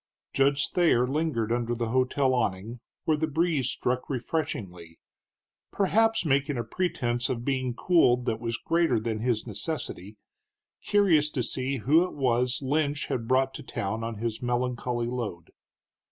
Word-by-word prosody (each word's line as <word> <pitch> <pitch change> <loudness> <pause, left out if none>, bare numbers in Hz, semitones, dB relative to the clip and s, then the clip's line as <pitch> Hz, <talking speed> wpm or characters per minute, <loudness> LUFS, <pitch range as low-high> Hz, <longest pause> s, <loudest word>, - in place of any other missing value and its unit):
Judge 140 +1 +3
Thayer 165 -9 +3
lingered 135 -5 -1
under 120 0 0
the 115 -1 -2
hotel 130 +2 +2
awning, 115 0 -2 0.3
where 155 -1 +2
the 160 +1 0
breeze 160 -3 +1
struck 125 +1 -2
refreshingly, 105 - -4 0.7
perhaps 220 0 +2
making 140 -1 +1
a 120 - -1
pretense 120 -10 -1
of 120 -2 -3
being 130 -3 -1
cooled 125 -7 +3
that 110 - -1
was 115 0 -2
greater 165 -8 +1
than 110 0 -3
his 115 -1 0
necessity, 105 - -5 0.7
curious 175 -8 +3
to 130 -4 -2
see 130 +3 -2
who 150 +9 +4
it 180 - -5
was 125 -1 +1
Lynch 145 +1 0
had 115 -2 -2
brought 130 +1 +2
to - - -7
town 110 +3 -4
on 115 0 -4
his 110 +1 -3
melancholy 120 -1 -1
load. 115 -9 -5
125 Hz, 150 wpm, -27 LUFS, 115-145 Hz, 0.7 s, who